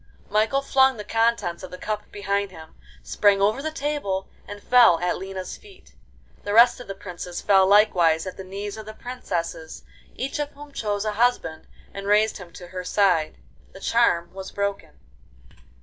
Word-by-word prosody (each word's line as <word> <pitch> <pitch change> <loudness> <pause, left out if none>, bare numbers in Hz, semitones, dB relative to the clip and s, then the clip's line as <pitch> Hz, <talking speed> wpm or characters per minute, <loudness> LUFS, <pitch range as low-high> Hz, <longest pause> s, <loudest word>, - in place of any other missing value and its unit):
Michael 220 +6 +2
flung 265 -2 +3
the 210 - -6
contents 225 -6 0
of 185 - -8
the 180 - -9
cup 210 +2 -5
behind 200 0 -1
him, 160 -3 -13 0.3
sprang 205 -1 +3
over 210 +6 +2
the 315 - -2
table, 285 -11 -3 0.2
and 205 - -8
fell 245 -9 +6
at 175 +1 -1
Lina's 190 0 -6
feet. 400 -2 -18 0.5
The 205 0 -2
rest 240 +2 +6
of 245 - -10
the 195 - -6
princes 180 -2 -7
fell 195 -2 +4
likewise 180 -6 +4
at 185 - -6
the 190 - -8
knees 200 +2 -6
of 215 -1 -9
the 215 - -8
princesses, 170 -10 -5 0.3
each 275 +4 -4
of 295 -1 -2
whom 290 0 -12
chose 210 -5 -2
a 215 - 0
husband 210 -8 0 0.3
and 200 0 -6
raised 210 +1 +3
him 180 -4 -11
to 175 0 -11
her 185 0 -6
side. 180 -5 +1 0.4
The - - -11
charm 195 -7 +1
was 190 0 -7
broken. 200 - -4
205 Hz, 180 wpm, -24 LUFS, 185-230 Hz, 0.5 s, fell